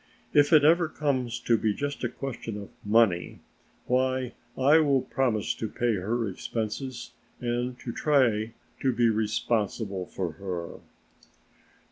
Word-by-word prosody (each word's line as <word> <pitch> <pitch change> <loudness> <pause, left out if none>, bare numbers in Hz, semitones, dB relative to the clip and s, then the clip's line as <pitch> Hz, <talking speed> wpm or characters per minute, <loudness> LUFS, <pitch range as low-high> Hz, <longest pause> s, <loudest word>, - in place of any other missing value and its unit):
"If 145 +1 +5
it 155 -3 +7
ever 165 +2 +5
comes 130 -6 -1
to 115 -2 +2
be 105 -2 +1
just 145 -1 -4
a 120 - +1
question 120 -4 -6
of 100 -1 -9
money, 105 -5 +2 0.4
why 130 0 0 0.2
I 145 +5 +6
will 140 -4 +3
promise 120 -5 0
to 110 - -4
pay 120 +1 0
her 110 +4 -1
expenses 115 +5 -4 0.3
and 120 +1 -2
to 120 - -4
try 115 -7 +2 0.3
to 135 - +2
be 120 0 +3
responsible 105 -2 -1
for 90 -3 -3
her." 85 0 -6
120 Hz, 135 wpm, -27 LUFS, 105-130 Hz, 0.4 s, it